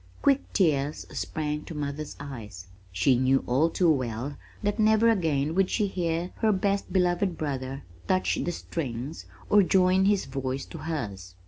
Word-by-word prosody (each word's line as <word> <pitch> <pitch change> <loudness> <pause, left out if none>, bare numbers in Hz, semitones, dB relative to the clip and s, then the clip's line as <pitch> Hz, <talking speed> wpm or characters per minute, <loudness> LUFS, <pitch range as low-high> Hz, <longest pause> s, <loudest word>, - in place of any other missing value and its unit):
Quick 280 -1 +2
tears 150 -6 +1
sprang 150 -1 -3
to 165 - -8
mother's 145 0 -4
eyes. 110 -10 -8 0.3
She 90 +9 +3
knew 130 +1 +3
all 135 +7 +2
too 170 0 +3
well 130 0 -2 0.3
that 205 +2 0
never 220 +1 +5
again 155 -7 +1
would 190 +1 +2
she 210 - +1
hear 175 -2 -2
her 220 -1 +3
best 200 0 0
beloved 180 -1 +1
brother 135 -2 -4 0.2
touch 185 0 +1
the 175 - -1
strings 140 -3 -5 0.2
or 205 - +6
join 185 0 +4
his 200 -1 +2
voice 135 0 -3
to 165 - -9
hers. 100 - -5
155 Hz, 155 wpm, -27 LUFS, 135-185 Hz, 0.3 s, or